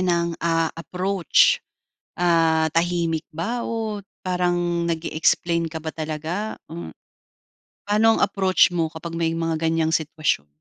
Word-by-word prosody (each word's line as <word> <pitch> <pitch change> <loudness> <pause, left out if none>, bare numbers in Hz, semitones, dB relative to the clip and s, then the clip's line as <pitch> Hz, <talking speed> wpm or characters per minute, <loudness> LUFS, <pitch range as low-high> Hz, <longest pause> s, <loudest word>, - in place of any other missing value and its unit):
ng, 170 -2 +1
ah, 165 -1 +1
approach? 185 +2 +2 0.6
Ah, 165 -2 +3
tahimik 170 -1 0
ba 180 +10 -3
o 220 -3 -3 0.2
parang 175 -1 0
nag-e-explain 165 +1 +1
ka 160 -1 -7
ba 160 - -3
talaga? 160 +7 -4
Ah, 80 -2 -7 0.9
paano 210 +2 +3
ang - - -2
approach 190 -2 +3
mo 170 -2 0
kapag 165 +1 -7
may 165 -1 +1
mga 165 -1 -1
ganyang 160 0 +1
sitwasyon? 155 - 0
170 Hz, 125 wpm, -23 LUFS, 160-180 Hz, 0.9 s, Ah